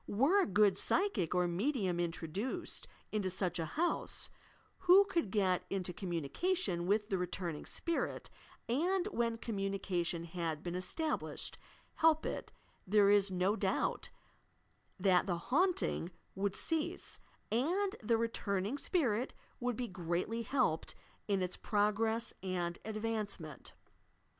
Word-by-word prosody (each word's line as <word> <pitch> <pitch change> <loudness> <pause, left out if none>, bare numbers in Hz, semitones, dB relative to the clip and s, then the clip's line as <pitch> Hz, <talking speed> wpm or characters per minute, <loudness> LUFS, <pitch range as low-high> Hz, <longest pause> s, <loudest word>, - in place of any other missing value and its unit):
Were 280 - +4
a - - +1
good 200 -1 +4
psychic 225 - +1
or 180 0 +3
medium 190 -1 0
introduced 180 - -3 0.2
into 205 -3 0
such 180 -1 -1
a 165 - 0
house, 340 - -1 0.5
who 380 +2 +7
could 340 - 0
get 185 -3 +2
into 185 -2 -2
communication 175 - -1
with 210 +1 +2
the 190 - +1
returning 175 -3 -3
spirit, 335 -1 -2 0.4
and, 350 +9 +1
when 235 - 0
communication 195 -6 -2
had 165 -2 -3
been 175 - -3
established, 305 - -2 0.4
help 320 -1 +4
it, - - -4 0.2
— - - -36
there 200 0 +5
is 205 -1 +5
no 185 +2 +1
doubt - - 0 0.9
that 185 -1 +4
the 175 -3 +1
"haunting" 275 - +1 0.2
would 195 0 -1
cease 320 -2 -1 0.3
and 350 - +2
that 430 - -11
the 230 -1 +4
returning 225 +1 -1
spirit 255 - +1 0.2
would 245 -1 0
be 245 +1 -2
greatly 180 +5 -2
helped 230 - 0 0.3
in 195 -3 +2
its 180 0 -3
progress 220 +2 +1
and 175 -2 -2
advancement. 215 - -3
205 Hz, 130 wpm, -35 LUFS, 180-255 Hz, 0.9 s, who